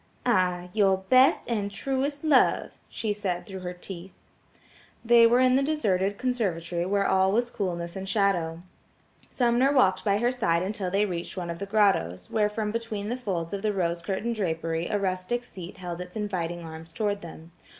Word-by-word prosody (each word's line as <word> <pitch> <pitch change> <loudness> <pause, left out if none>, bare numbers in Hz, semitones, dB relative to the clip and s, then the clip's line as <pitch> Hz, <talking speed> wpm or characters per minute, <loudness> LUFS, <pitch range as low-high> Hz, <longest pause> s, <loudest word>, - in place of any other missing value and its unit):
"Aye, 180 -6 +1
your 195 -3 +3
best 255 +8 +4
and 210 -4 -1
truest 270 +7 -2
love," 300 -5 +3 0.2
she 215 -2 -2
said 180 -4 -3
through 190 -1 -7
her 180 -1 -5
teeth. 180 0 -9 0.9
They 235 0 +7
were 240 +2 +4
in 255 0 +4
the - - +2
deserted 205 -10 0
conservatory 180 -9 -1
where 200 0 +1
all 190 0 +3
was 240 +3 +1
coolness 170 -4 -3
and 190 0 -5
shadow; 175 -6 +1 0.7
Sumner 245 +2 +2
walked 190 -9 +3
by 200 -2 +2
her 240 +3 +2
side 175 -9 +1
until 195 -1 -2
they 200 +3 +2
reached 175 -1 -5
one 175 -2 -3
of 170 - -7
the 200 - -4
grottoes, 190 - +1
where 210 -1 +2
from 210 0 -2
between 220 -2 -4
the 245 - -1
folds 185 -9 -3
of 200 - -3
the 215 0 0
rose 170 -3 -1
curtain 200 +7 -2
drapery 165 -4 -2
a 210 - 0
rustic 190 +5 -2
seat 185 -7 -10
held 180 -2 -6
its 180 0 -9
inviting 175 -5 -3
arms 160 0 -10
toward 205 -2 -1
them. 165 0 -11
195 Hz, 180 wpm, -27 LUFS, 175-225 Hz, 0.9 s, They